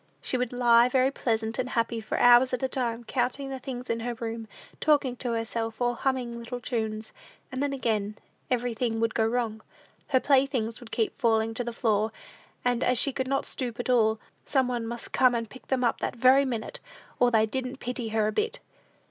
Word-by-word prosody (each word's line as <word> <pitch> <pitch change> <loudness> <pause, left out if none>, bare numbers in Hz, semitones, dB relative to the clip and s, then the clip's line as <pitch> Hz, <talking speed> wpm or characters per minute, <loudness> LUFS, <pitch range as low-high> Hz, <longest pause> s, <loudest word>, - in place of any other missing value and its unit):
She - - -3
would 250 -1 -1
lie 240 -1 +5
very 260 +1 +3
pleasant 225 -3 -1
and 255 - -1
happy 230 -1 -1
for 215 - -3
hours 245 +1 +6
at 250 - -7
a - - +3
time, 240 -3 -2
counting 255 +4 -1
the 265 - -4
things 250 -1 -6
in 230 - -1
the 240 +1 -3
room, 225 -1 -5 0.3
talking 285 -4 +2
to 240 -2 -2
herself, 225 0 -3
or 245 0 +1
humming 245 -2 -1
little 245 +1 -6
tunes; 220 -2 -3 0.4
and 260 0 -3
then, 285 -1 0
again, 215 -6 -1 0.3
everything 240 -2 -1
would 225 -1 +1
go 220 -1 +2
wrong. 225 -2 -1 0.5
Her 260 - +3
playthings 260 -5 +1
would 240 - -12
keep 230 +5 -2
falling 225 -2 +2
to 245 +2 -3
the 240 - -4
floor, 220 -1 +1 0.5
and, 245 -1 +2
as 250 0 +2
she 275 +3 +3
could 260 0 -2
not 275 +1 0
stoop 245 -3 -5
at 245 - -1
all, 220 -3 +3 0.2
some 265 -3 +1
one 240 -2 -2
must 235 0 -6
come 255 -2 +4
and 230 -1 -2
pick 255 +4 -14
them 260 -1 0
up 235 - +1
that - - -2
very 260 +3 +5
minute, 250 - -4 0.4
or 245 - +5
they 220 -2 +4
"didn't 255 +3 -4
pity 245 -1 -4
her 220 -1 +1
a 215 - +1
bit." 430 - -1
240 Hz, 205 wpm, -27 LUFS, 225-255 Hz, 0.5 s, hours